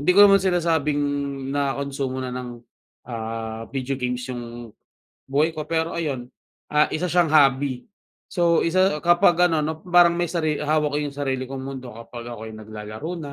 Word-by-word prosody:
hindi 145 Hz, -, -5 dB
ko 205 Hz, -, +10 dB
naman 195 Hz, -1 st, +6 dB
sinasabing 165 Hz, -5 st, +1 dB, 0.5 s
nakonsumo 140 Hz, -2 st, -2 dB
na 125 Hz, -, -4 dB
ng, 125 Hz, -1 st, -5 dB, 0.5 s
ah, 115 Hz, -1 st, -5 dB
video 135 Hz, 0 st, -3 dB
games 125 Hz, 0 st, -2 dB
yung 120 Hz, -2 st, -8 dB, 0.5 s
buhay 145 Hz, +4 st, +2 dB
ko, 155 Hz, -2 st, -6 dB
pero 165 Hz, +1 st, 0 dB
ayun, 140 Hz, -7 st, -3 dB, 0.4 s
ah, 150 Hz, 0 st, +4 dB
isa 175 Hz, +3 st, -1 dB
siyang 175 Hz, -3 st, +3 dB
hobby. 135 Hz, -3 st, +4 dB, 0.5 s
So, 170 Hz, -3 st, +3 dB
isa 185 Hz, -2 st, +2 dB
kapag 175 Hz, 0 st, +4 dB
ano 160 Hz, -, +2 dB
'no, 155 Hz, +1 st, -2 dB
parang 175 Hz, -1 st, +5 dB
may 175 Hz, -1 st, -1 dB
sari 155 Hz, -4 st, -1 dB
hawak 150 Hz, -1 st, +1 dB
ko -, -, +1 dB
yung 145 Hz, -, -3 dB
sarili 130 Hz, -2 st, -2 dB
kong 135 Hz, -1 st, -5 dB
mundo 130 Hz, -2 st, -7 dB
kapag 115 Hz, +1 st, -9 dB
ako'y 110 Hz, -1 st, -8 dB
naglalaro 110 Hz, +7 st, -7 dB
na 145 Hz, -3 st, -7 dB
145 Hz, 165 wpm, -23 LUFS, 125-165 Hz, 0.5 s, ko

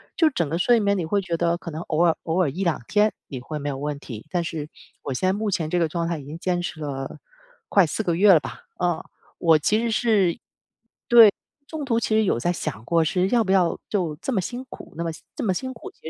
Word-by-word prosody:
就 320 Hz, -2 st, +4 dB
整 170 Hz, -, -1 dB
个 165 Hz, -, -1 dB
睡 235 Hz, +6 st, +4 dB
眠， 200 Hz, 0 st, +2 dB
你 175 Hz, -, -2 dB
会 200 Hz, +5 st, +1 dB
觉 175 Hz, -3 st, -2 dB
得 170 Hz, 0 st, +1 dB
可 170 Hz, -, -8 dB
能 160 Hz, +2 st, -5 dB
偶 165 Hz, +2 st, +1 dB
尔 165 Hz, -, +3 dB
偶 170 Hz, +3 st, 0 dB
尔 155 Hz, -, +2 dB
1-2 170 Hz, -4 st, -1 dB
天 210 Hz, 0 st, +3 dB, 0.2 s
你 130 Hz, -4 st, -6 dB
会 150 Hz, +4 st, -5 dB
没 145 Hz, -, -5 dB
有 135 Hz, -, -3 dB
问 145 Hz, 0 st, -4 dB
题， 115 Hz, -6 st, -9 dB
但 175 Hz, -2 st, 0 dB
是 150 Hz, -2 st, -5 dB, 0.3 s
我 135 Hz, -, -3 dB
现 185 Hz, +9 st, 0 dB
在 190 Hz, -, +3 dB
目 210 Hz, 0 st, -2 dB
前 165 Hz, -4 st, -1 dB
这 175 Hz, -, 0 dB
个 165 Hz, -, +2 dB
状 170 Hz, 0 st, -2 dB
态 170 Hz, -2 st, -2 dB
已 140 Hz, -, -10 dB
经 150 Hz, +3 st, -7 dB
坚 175 Hz, -1 st, 0 dB
持 165 Hz, -2 st, -5 dB
了 135 Hz, 0 st, -5 dB, 0.5 s
快 195 Hz, -4 st, +5 dB
4 220 Hz, -, -2 dB
个 170 Hz, -3 st, 0 dB
月 200 Hz, +2 st, +6 dB
了 160 Hz, -, +6 dB
吧。 -, -, -8 dB, 0.2 s
嗯， 175 Hz, -2 st, +1 dB, 0.4 s
我 165 Hz, -2 st, +5 dB
其 210 Hz, +8 st, +2 dB
实 235 Hz, -1 st, -1 dB
是 210 Hz, -7 st, +2 dB, 0.7 s
对， 230 Hz, -4 st, +9 dB, 0.3 s
中 315 Hz, -2 st, -5 dB
途 230 Hz, -3 st, +1 dB
其 -, -, -2 dB
实 220 Hz, -, +4 dB
有 180 Hz, -, +1 dB
在 175 Hz, -, 0 dB
想 145 Hz, -10 st, -5 dB
过 165 Hz, -1 st, +3 dB
是 180 Hz, +4 st, +1 dB
要 235 Hz, -2 st, +3 dB
不 190 Hz, -, -1 dB
要 180 Hz, -3 st, +3 dB
就 175 Hz, -7 st, -1 dB
这 270 Hz, -, -2 dB
么 195 Hz, -, +1 dB
辛 245 Hz, +7 st, -5 dB
苦？ -, -, -11 dB
那 170 Hz, -, -2 dB
么 165 Hz, -, -1 dB, 0.2 s
这 -, -, -4 dB
么 190 Hz, -, +1 dB
辛 260 Hz, +7 st, -4 dB
苦， 230 Hz, -, -10 dB
其 -, -, -28 dB
175 Hz, 270 characters per minute, -24 LUFS, 160-205 Hz, 0.7 s, 对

